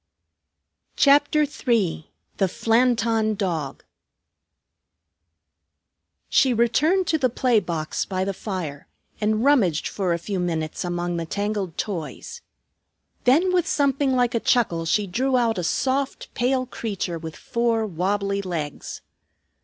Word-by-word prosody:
CHAPTER 290 Hz, +2 st, +4 dB
III 230 Hz, -, -1 dB, 0.3 s
THE 195 Hz, -, +2 dB
FLANTON 225 Hz, 0 st, +2 dB
DOG 170 Hz, -9 st, -3 dB, 2.4 s
She 260 Hz, -3 st, +3 dB
returned 305 Hz, -, +2 dB
to 315 Hz, -, +1 dB
the 255 Hz, -2 st, +2 dB
play 240 Hz, -1 st, +2 dB
box 160 Hz, -5 st, -3 dB
by 185 Hz, -1 st, -2 dB
the 195 Hz, -, -2 dB
fire, 180 Hz, -8 st, -5 dB, 0.3 s
and 215 Hz, +1 st, +1 dB
rummaged 220 Hz, -, +3 dB
for 190 Hz, -3 st, -2 dB
a 170 Hz, -, +1 dB
few 190 Hz, +3 st, -4 dB
minutes 160 Hz, -2 st, -2 dB
among 175 Hz, 0 st, -2 dB
the 165 Hz, -1 st, -4 dB
tangled 200 Hz, -3 st, -3 dB
toys. 195 Hz, -, -5 dB, 0.8 s
Then 330 Hz, +9 st, +4 dB
with 360 Hz, -1 st, +2 dB
something 275 Hz, -2 st, +1 dB
like 245 Hz, 0 st, +2 dB
a 230 Hz, -, +1 dB
chuckle 195 Hz, -10 st, +1 dB
she 205 Hz, +6 st, +1 dB
drew 255 Hz, +8 st, 0 dB
out 230 Hz, -5 st, +1 dB
a -, -, -2 dB
soft, 265 Hz, +9 st, -1 dB
pale 255 Hz, +1 st, +1 dB
creature 195 Hz, -8 st, -4 dB
with 160 Hz, -1 st, -7 dB
four 235 Hz, -1 st, 0 dB
wobbly 200 Hz, +2 st, -1 dB
legs. 165 Hz, -6 st, -5 dB
215 Hz, 125 wpm, -23 LUFS, 175-255 Hz, 2.4 s, CHAPTER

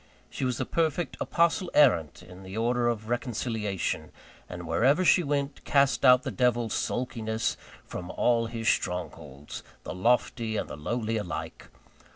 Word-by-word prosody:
She 135 Hz, -, -3 dB
was 125 Hz, -3 st, -1 dB
a -, -, -1 dB
perfect 165 Hz, +1 st, -1 dB
Apostle 170 Hz, +1 st, +1 dB
errant 85 Hz, -, +4 dB
of 90 Hz, +1 st, -13 dB
the 95 Hz, +3 st, -7 dB
order 120 Hz, +1 st, +1 dB
of 110 Hz, -2 st, -2 dB
Reconciliation; 115 Hz, -, -2 dB, 0.4 s
and 90 Hz, -1 st, -7 dB
wherever 140 Hz, -, +3 dB
she 180 Hz, -, +6 dB
went, 140 Hz, -2 st, -2 dB
cast 140 Hz, -1 st, +2 dB
out 125 Hz, -1 st, +7 dB
the -, -, -3 dB
devil 120 Hz, -2 st, +1 dB
Sulkiness 110 Hz, -1 st, -2 dB, 0.3 s
from 90 Hz, 0 st, -7 dB
all 115 Hz, +2 st, +1 dB
his 115 Hz, 0 st, -4 dB
strongholds 75 Hz, -5 st, -2 dB, 0.2 s
the -, -, -5 dB
lofty 115 Hz, +2 st, +1 dB
and -, -, -2 dB
the -, -, -7 dB
lowly 115 Hz, +8 st, -2 dB
alike. 105 Hz, -5 st, -5 dB
115 Hz, 150 wpm, -28 LUFS, 105-130 Hz, 0.4 s, out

